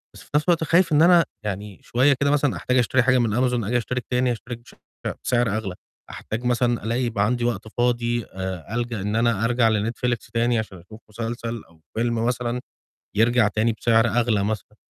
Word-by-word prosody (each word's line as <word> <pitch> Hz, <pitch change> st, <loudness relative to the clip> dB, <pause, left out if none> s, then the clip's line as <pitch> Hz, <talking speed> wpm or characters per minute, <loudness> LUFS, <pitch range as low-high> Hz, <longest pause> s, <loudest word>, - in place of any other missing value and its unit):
بس -, -, -12 dB
في -, -, -22 dB
نَفْس 150 Hz, -, +3 dB
الوقت 165 Hz, -2 st, +3 dB
خايف 165 Hz, +2 st, +3 dB
إن 150 Hz, +1 st, +4 dB
أنا 170 Hz, 0 st, +6 dB, 0.2 s
يعني 100 Hz, 0 st, -5 dB
شوية 135 Hz, +4 st, +3 dB
كده 140 Hz, 0 st, +2 dB
مثلًا 145 Hz, -2 st, +2 dB
أحتاج 125 Hz, 0 st, 0 dB
أشتري 125 Hz, +1 st, +3 dB
حاجة 130 Hz, 0 st, +4 dB
من 110 Hz, -3 st, +1 dB
Amazon 125 Hz, -2 st, +1 dB
آجي 120 Hz, +2 st, +1 dB
أشترك 125 Hz, +1 st, -3 dB
تاني، 125 Hz, 0 st, +2 dB
أشترك 120 Hz, +1 st, -6 dB
بشعر 120 Hz, -, -19 dB, 0.4 s
بسعر 120 Hz, -3 st, +1 dB
أغلى. 95 Hz, -5 st, -4 dB, 0.3 s
أحتاج 110 Hz, +3 st, -5 dB
مثلًا 120 Hz, -2 st, +1 dB
ألاقي 120 Hz, +3 st, -1 dB
يبقى 110 Hz, -4 st, 0 dB
عندي 120 Hz, +1 st, 0 dB
وقت 110 Hz, -2 st, -2 dB
فاضي 120 Hz, 0 st, 0 dB
آآ 95 Hz, +2 st, -5 dB
ألجأ 120 Hz, -4 st, -2 dB
إن 105 Hz, +2 st, -2 dB
أنا 115 Hz, -2 st, +2 dB
أرجع 120 Hz, -1 st, +3 dB
لNetflix 115 Hz, +3 st, -1 dB
تاني 115 Hz, 0 st, +2 dB
عشان 105 Hz, -4 st, -6 dB
أشوف 100 Hz, +6 st, -14 dB
مسلسل 115 Hz, +1 st, -5 dB
أو 80 Hz, -1 st, -24 dB, 0.2 s
فيلم 115 Hz, 0 st, 0 dB
مثلًا، 125 Hz, 0 st, -1 dB, 0.6 s
يرجع 115 Hz, 0 st, +4 dB
تاني 110 Hz, +2 st, +1 dB
بسعر 115 Hz, +1 st, +3 dB
أغلى 110 Hz, -2 st, +1 dB
مثلًا. 105 Hz, 0 st, -4 dB
120 Hz, 195 wpm, -23 LUFS, 110-125 Hz, 0.6 s, أنا